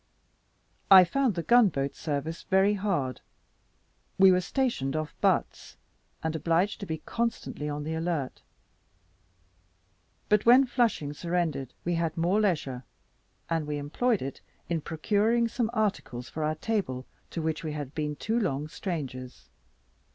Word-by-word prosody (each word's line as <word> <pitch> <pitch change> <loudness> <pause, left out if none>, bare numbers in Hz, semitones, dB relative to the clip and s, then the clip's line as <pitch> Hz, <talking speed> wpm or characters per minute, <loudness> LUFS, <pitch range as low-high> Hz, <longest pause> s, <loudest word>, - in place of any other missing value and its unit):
I 190 -1 +10
found 250 +4 +1
the 170 - -2
gun 240 -1 +6
boat 140 -3 -2
service 155 +1 -3
very 190 +2 +3
hard. 185 -11 -1 1.0
We 190 0 +8
were 180 0 +3
stationed 180 - -1
off 155 -1 -3
Batz, - - 0 0.5
and 160 0 -1
obliged 170 +5 +1
to 200 - -6
be 160 -1 -4
constantly 230 -10 -2
on 145 0 -3
the 160 +2 -3
alert; 160 -5 -2 1.9
but 210 0 +3
when 250 +3 +7
Flushing 230 - 0
surrendered 160 -6 -2
we 175 - +1
had 165 -1 -1
more 180 +6 +2
leisure, 145 -10 -1 0.6
and 165 -3 -1
we 150 0 -2
employed 195 - 0
it 135 - -6 0.3
in 165 -2 0
procuring 210 +9 +1
some 230 0 -1
articles 205 - -2
for 155 - -4
our 155 +1 0
table, 155 - -2 0.2
to - - -5
which 160 0 -2
we 155 -2 -3
had 145 -2 -5
been 150 -1 -2
too 225 +9 -1
long 150 - -1
strangers. 130 - -6
165 Hz, 145 wpm, -28 LUFS, 150-205 Hz, 1.9 s, I